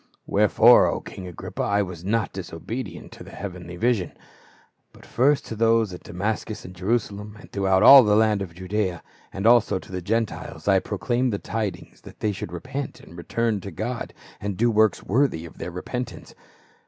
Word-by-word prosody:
"Wherefore, - - +6
O - - -1
king 95 - -9
Agrippa, 90 - -6
I 100 0 +1
was 90 -3 -8
not 110 +1 0
disobedient - - -6
to - - -11
the - - -12
heavenly 90 -3 -7
vision. 110 -3 0 0.8
But - - -16
first 140 +3 +2
to 115 - -6
those 115 -2 +2
at 90 - -9
Damascus 105 +4 -4
and 90 - -9
Jerusalem, 105 +2 -2
and - - -15
throughout 95 0 +2
all 135 +3 +11
the 105 -3 +3
land 110 -2 +3
of 85 -4 -6
Judaea, 95 -1 -2 0.3
and 95 +2 -5
also 115 -4 +5
to 95 - -11
the 90 -1 -4
Gentiles, 110 +4 -3
I - - +5
proclaimed 125 +1 -1
the 100 - -1
tidings 105 -5 -5
that - - -14
they 105 - 0
should 95 -3 -6
repent 130 +9 -5
and - - -15
return 110 +4 -1
to 100 - -7
God, 115 +7 -4 0.3
and 100 -2 -4
do 120 +3 +3
works 110 -3 +3
worthy 115 - +1
of 85 - -13
their - - -4
repentance. 125 +8 -6
105 Hz, 180 wpm, -24 LUFS, 90-115 Hz, 0.8 s, all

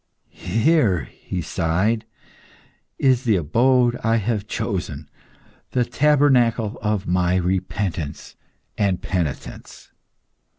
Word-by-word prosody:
"Here," 115 - +3
he 90 -2 -6
sighed, 95 +8 0 0.9
"is 130 -2 +2
the 110 -4 +3
abode 120 - +2
I 115 0 +2
have 110 -1 -1
chosen; 85 -11 -4 0.7
the 125 -1 +2
tabernacle 125 -5 +2
of 105 -2 -1
my 90 0 +1
repentance 90 -3 -2 0.4
and 95 -3 +1
penitence." 85 -7 -5
105 Hz, 90 wpm, -22 LUFS, 90-120 Hz, 0.9 s, Here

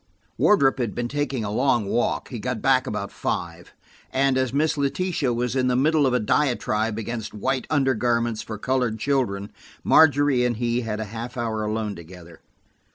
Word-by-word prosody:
Wardrop 135 -11 +3
had 115 -4 -2
been 120 0 -2
taking 140 -3 -2
a 105 - -3
long 120 -1 +2
walk; 120 +4 -1
he 120 - -6
got 125 +1 -3
back 130 +2 +2
about 100 -1 -4
five, - - -4 0.4
and 135 0 +2
as 130 -1 0
Miss 150 +3 +1
Letitia 145 0 -1
was 120 +1 -1
in 130 -1 +1
the 125 - +2
middle 150 +2 +3
of 130 - 0
a - - +2
diatribe 110 -3 0
against 115 -1 -5
white 130 +5 -2
undergarments 120 -5 +1
for 110 - -7
colored 125 -1 0
children, 110 -6 -1 0.3
Margery 145 -4 +4
and 120 -2 0
he 120 +1 0
had 110 -2 -4
a 110 - -3
half 120 +3 -6
hour 110 -2 -2
alone 105 -1 -2
together. 85 0 -13
120 Hz, 175 wpm, -24 LUFS, 110-135 Hz, 0.4 s, Margery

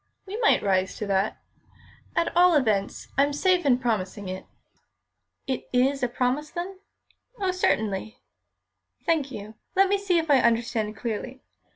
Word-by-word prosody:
"We 390 +1 -6
might 455 -2 +3
rise 190 -1 +1
to 210 - -3
that. 195 +1 0 0.8
At 335 - 0
all 355 -1 +6
events, 215 -8 0
I'm 285 +1 +3
safe 360 +2 +2
in 250 -3 +5
promising 205 -5 -2
it." 185 0 -6 1.0
"It 260 -2 -3
is 265 +2 +2
a 245 - +2
promise, 255 +5 -1
then?" 370 +3 -6 0.6
"Oh, 380 -2 +1
certainly." 220 - 0 0.9
"Thank 310 -5 +1
you. 210 -3 -8 0.2
Let 385 0 +5
me 400 0 +2
see 385 -3 +1
if 325 -2 0
I 275 - +6
understand 230 -2 +1
clearly. 245 +3 -5
255 Hz, 150 wpm, -26 LUFS, 215-335 Hz, 1.0 s, all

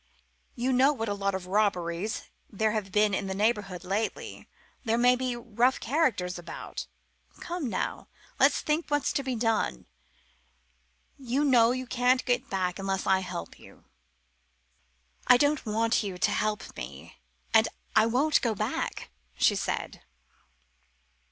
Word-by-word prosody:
You 255 +2 0
know 265 +3 +5
what 225 -5 -3
a - - 0
lot 200 -1 -1
of 190 -1 -5
robberies 185 -1 0 0.3
there 220 +1 0
have 210 -3 -3
been 210 0 +3
in 195 +1 -1
the 190 - -3
neighbourhood 205 -3 0
lately; 205 +4 -3 0.3
there 225 -2 +1
may 245 +1 +5
be 250 -1 -2
rough 240 +2 +1
characters 225 - 0
about. 175 - -7 0.5
Come 345 -7 -4
now, - - -3 0.3
let's - - +4
think 310 +2 -1
what's 290 -1 0
to - - 0
be 260 -2 -3
done. 225 - 0 1.3
You 265 +3 0
know 240 -4 +5
you 255 +1 -2
can't 250 +1 +2
get 245 -1 0
back 185 -1 -1
unless 195 -1 -2
I 190 0 +4
help 185 - -6
you." - - -17 1.4
"I 250 - +8
don't 290 -1 +1
want 225 +2 +2
you 195 -4 -5
to - - +1
help 215 0 -2
me; - - -9 0.3
and 220 0 +6 0.3
I 220 +1 +5
won't 275 +6 +2
go 230 -3 0
back," 130 - -3 0.2
she - - +4
said. - - -3
225 Hz, 145 wpm, -28 LUFS, 195-250 Hz, 1.4 s, I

